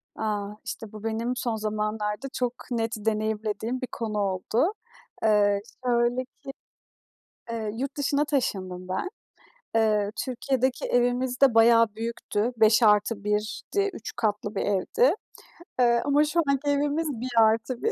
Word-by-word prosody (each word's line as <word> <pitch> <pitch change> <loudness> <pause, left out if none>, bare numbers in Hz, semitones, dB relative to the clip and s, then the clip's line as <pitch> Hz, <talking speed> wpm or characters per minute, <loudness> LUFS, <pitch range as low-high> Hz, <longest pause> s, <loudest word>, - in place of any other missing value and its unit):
A! 205 -2 -2 0.2
İşte 225 -2 -6
bu 215 0 -10
benim 230 +2 -1
son 240 -2 -1
zamanlarda 215 +2 -2
çok 245 -2 -1 0.2
net 230 -1 -1
deneyimlediğim 220 +2 -2
bir 255 - -3
konu 220 -2 -3
oldu. 205 - 0 0.5
Eee, 205 -2 +3 0.2
şöyle 240 +1 +2
ki, 255 - -33 1.1
eee, 220 -2 -3
yurt 275 +4 -4
dışına 285 +1 +1
taşındım 185 - -2
ben. 190 - -2 0.7
Eee, 210 -2 +2
Türkiye'deki 260 0 -1
evimiz 245 +1 +1
de 270 -4 +6
bayağı 230 0 +6
büyüktü. 230 0 -2
5+1'di 215 - +2
3 225 - -7
katlı 210 -2 -1
bir - - 0
evdi. 205 - +2 0.6
Eee, 235 -1 +4
ama 290 +1 +4
şu 305 +3 0
anki 280 +1 0
evimiz 290 +3 +1
1+1, 235 - +2
230 Hz, 125 wpm, -26 LUFS, 210-255 Hz, 1.1 s, de